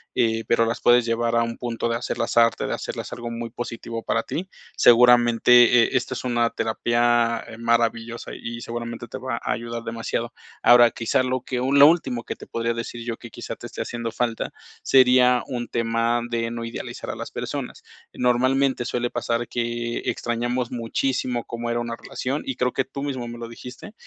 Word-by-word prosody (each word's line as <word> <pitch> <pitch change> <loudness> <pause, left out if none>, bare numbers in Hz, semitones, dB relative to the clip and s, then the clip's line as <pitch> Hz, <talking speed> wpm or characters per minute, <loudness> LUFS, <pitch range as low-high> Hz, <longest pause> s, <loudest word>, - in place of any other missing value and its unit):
eh, 115 -1 +1
pero 115 0 +3
las 115 +1 -2
puedes 120 0 +5
llevar 115 0 0
a 115 - +4
un 115 0 -4
punto 120 -1 -3
de 115 - 0
hacerlas 115 -1 -3
arte, 115 0 +4
de - - -2
hacerlas - - -5
algo 120 -1 -6
muy 115 0 -5
positivo 115 -1 -6
para 115 0 0
ti. 185 +3 -5 0.3
Seguramente, 120 0 +6
e 130 - 0
esta 130 - -2
es - - -5
una 120 -2 +1
terapia, 120 +1 +1
eh, 115 - -10
maravillosa 115 0 0
y 115 0 -6
seguramente 120 0 -6
te - - -7
va 130 -2 -3
a - - -2
ayudar 115 0 -5
demasiado. 115 0 -3 0.3
Ahora, 120 -1 +7
quizá 115 +2 0
lo 130 0 -1
que 130 - -3
lo 140 +3 +6
último 140 -8 +1
que - - -5
te - - -12
podría 115 0 -1
decir 115 0 -5
yo, 115 -1 -4
que 115 - -11
quizá - - -6
te - - -11
esté - - -7
haciendo 115 -1 -4
falta, 115 0 -2 0.3
sería 125 -1 +5
un 120 -1 -4
tema 115 +1 0
de 115 -1 -1
no 115 0 -5
idealizar 115 - -6
a - - -3
las - - -7
personas. - - -5 0.3
Normalmente, 130 +1 +2
suele 120 0 -1
pasar 120 0 -2
que 120 0 -2
extrañamos 120 +1 -2
muchísimo 125 +1 -1
cómo 120 0 -5
era 120 0 0
una 120 0 -3
relación, 135 +4 -4
y 130 - -3
creo 125 0 0
que 130 - -1
tú 140 - -7
mismo 130 -4 -3
me 120 0 -8
lo 115 -1 -6
dijiste. 125 - -10
120 Hz, 190 wpm, -23 LUFS, 115-125 Hz, 0.3 s, Ahora